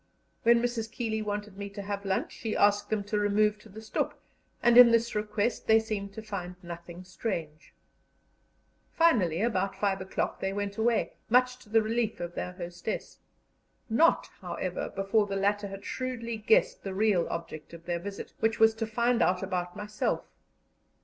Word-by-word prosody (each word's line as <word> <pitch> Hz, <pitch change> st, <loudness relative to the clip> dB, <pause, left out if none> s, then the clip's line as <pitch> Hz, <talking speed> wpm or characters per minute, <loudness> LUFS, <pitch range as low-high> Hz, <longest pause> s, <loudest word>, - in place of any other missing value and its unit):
When 235 Hz, -1 st, +5 dB
Mrs. 230 Hz, -2 st, -2 dB
Keeley 225 Hz, -3 st, -2 dB
wanted 205 Hz, -1 st, -4 dB
me 200 Hz, 0 st, -4 dB
to 200 Hz, 0 st, -7 dB
have 200 Hz, 0 st, -4 dB
lunch, 190 Hz, -1 st, -1 dB
she 220 Hz, -2 st, -4 dB
asked 205 Hz, 0 st, +3 dB
them 215 Hz, -2 st, 0 dB
to 210 Hz, +1 st, -1 dB
remove 210 Hz, +1 st, +2 dB
to 215 Hz, -, -16 dB
the 215 Hz, +2 st, -10 dB
stoep, 220 Hz, -, -1 dB, 0.5 s
and 240 Hz, 0 st, +5 dB
in 245 Hz, -1 st, +11 dB
this 230 Hz, 0 st, +2 dB
request 210 Hz, +2 st, -1 dB
they 220 Hz, 0 st, +7 dB
seemed 210 Hz, -3 st, -4 dB
to 220 Hz, -, -7 dB
find 185 Hz, -4 st, -5 dB
nothing 170 Hz, +1 st, -8 dB
strange. 175 Hz, -5 st, -5 dB, 1.2 s
Finally, 205 Hz, -, +3 dB
about 195 Hz, -4 st, 0 dB
five 195 Hz, -2 st, 0 dB
o'clock 190 Hz, -, -2 dB
they 190 Hz, 0 st, -2 dB
went 200 Hz, 0 st, -3 dB
away, 230 Hz, 0 st, +1 dB, 0.2 s
much 250 Hz, +1 st, +4 dB
to 235 Hz, -, -18 dB
the 225 Hz, 0 st, +4 dB
relief 225 Hz, 0 st, -1 dB
of 175 Hz, 0 st, -5 dB
their 180 Hz, -, -4 dB
hostess; 175 Hz, +3 st, -5 dB, 0.7 s
not, 325 Hz, +9 st, +4 dB, 0.2 s
however, -, -, -3 dB
before 195 Hz, +2 st, +1 dB
the 200 Hz, -, -3 dB
latter 200 Hz, +1 st, +1 dB
had 195 Hz, +1 st, -9 dB
shrewdly 245 Hz, -3 st, -3 dB
guessed 220 Hz, +1 st, +3 dB
the 195 Hz, -1 st, -4 dB
real 200 Hz, -4 st, +2 dB
object 160 Hz, -2 st, -6 dB
of 170 Hz, 0 st, -12 dB
their 175 Hz, -1 st, -1 dB
visit, 195 Hz, +3 st, -7 dB
which 225 Hz, 0 st, +1 dB
was 225 Hz, 0 st, +6 dB
to 225 Hz, 0 st, -3 dB
find 235 Hz, +2 st, +1 dB
out 185 Hz, +1 st, +2 dB
about 180 Hz, -2 st, -3 dB
myself. 210 Hz, 0 st, -2 dB
210 Hz, 175 wpm, -29 LUFS, 190-225 Hz, 1.2 s, in